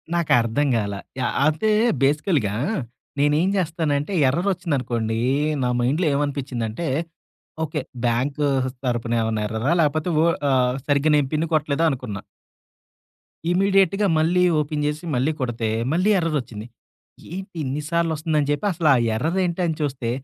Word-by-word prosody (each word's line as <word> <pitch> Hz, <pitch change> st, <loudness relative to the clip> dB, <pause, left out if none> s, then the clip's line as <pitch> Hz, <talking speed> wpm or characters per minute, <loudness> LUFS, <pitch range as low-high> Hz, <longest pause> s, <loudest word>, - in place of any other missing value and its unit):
నాకర్థం 145 Hz, -4 st, +2 dB
గాలా. 100 Hz, -2 st, -3 dB, 0.2 s
యాహ్! 125 Hz, -, -1 dB
అంతే 155 Hz, +8 st, +1 dB, 0.3 s
బేసికల్‌గా, 145 Hz, -, +1 dB, 0.7 s
నేనేం 150 Hz, +5 st, +3 dB
చేస్తానంటే 160 Hz, -2 st, -1 dB, 0.2 s
ఎర్రరొచ్చిందనుకోండి. 130 Hz, -, -1 dB, 0.4 s
నా 125 Hz, -, +1 dB
మైండ్‌లో 150 Hz, +8 st, +1 dB
ఏమనిపించిందంటే 140 Hz, -2 st, -2 dB, 0.8 s
ఓకే. 155 Hz, -1 st, -3 dB, 0.2 s
బ్యాంకు 135 Hz, +5 st, 0 dB, 0.4 s
తరపునేమన్నా 115 Hz, -3 st, -1 dB
ఎర్రరా? 110 Hz, +6 st, -1 dB
లేపోతే 155 Hz, +2 st, 0 dB
ఓ -, -, +3 dB, 0.2 s
ఆహ్, 125 Hz, -1 st, +2 dB
సరిగ్గా 145 Hz, +1 st, +2 dB
నేను 145 Hz, -2 st, +2 dB
పిన్ను 155 Hz, +2 st, 0 dB
కొట్టలేదా 150 Hz, +1 st, +1 dB
అనుకున్నా. 125 Hz, -8 st, -4 dB, 1.3 s
ఇమ్మీడియేట్‌గా 195 Hz, +1 st, +3 dB
మళ్ళీ 175 Hz, +3 st, +3 dB, 0.2 s
ఓపెన్ 150 Hz, 0 st, -2 dB
చేసి 150 Hz, +2 st, -3 dB
మళ్ళీ 130 Hz, +5 st, +1 dB
కొడితే 120 Hz, -3 st, -2 dB, 0.2 s
మళ్ళీ 185 Hz, +5 st, +2 dB
ఎర్రరొచ్చింది. 140 Hz, -10 st, -3 dB, 0.7 s
ఏంటి 190 Hz, +1 st, -7 dB
ఇన్ని 140 Hz, +2 st, -3 dB
సార్లు 170 Hz, -1 st, +1 dB
వస్తుందని 150 Hz, -2 st, 0 dB
చెప్పి 145 Hz, +7 st, -1 dB
అసల 165 Hz, -3 st, +1 dB, 0.3 s
ఎర్రరేంటని 170 Hz, +4 st, 0 dB
చూస్తే. 135 Hz, -5 st, -2 dB
145 Hz, 115 wpm, -22 LUFS, 125-165 Hz, 1.3 s, నేనేం